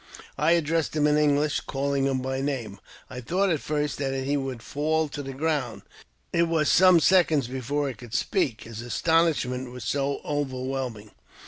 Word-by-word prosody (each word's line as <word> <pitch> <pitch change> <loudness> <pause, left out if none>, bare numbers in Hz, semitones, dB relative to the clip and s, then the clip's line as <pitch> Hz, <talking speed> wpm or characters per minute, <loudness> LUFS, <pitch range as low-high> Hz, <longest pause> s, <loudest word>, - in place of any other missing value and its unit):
" - - -21
I 155 +3 +4
addressed 165 -1 0
him 150 -1 +2
in 150 0 +4
English, 150 0 +2
calling 140 0 -1
him 135 -1 0
by 130 0 -2
name. 125 -8 -3 0.3
I 125 - -8
though 180 +11 0
at 165 -5 +1
first 150 -1 -2
that 135 -1 -1
he 140 +2 0
would 135 -4 -4
fall 155 +2 0
to 145 - -5
the 135 -1 -6
ground; 140 -4 -2 0.5
it 170 0 +3
was 160 -3 +1
some 185 -1 +6
seconds 160 -6 +3
before 135 +3 -2
he 135 - -3
could 120 +1 -9
speak, 140 - 0
his 115 0 -8
astonishment 130 -2 +1
was 125 -2 -8
so 140 +3 -1
overwhelming. 130 -6 -3
140 Hz, 180 wpm, -26 LUFS, 130-155 Hz, 0.5 s, some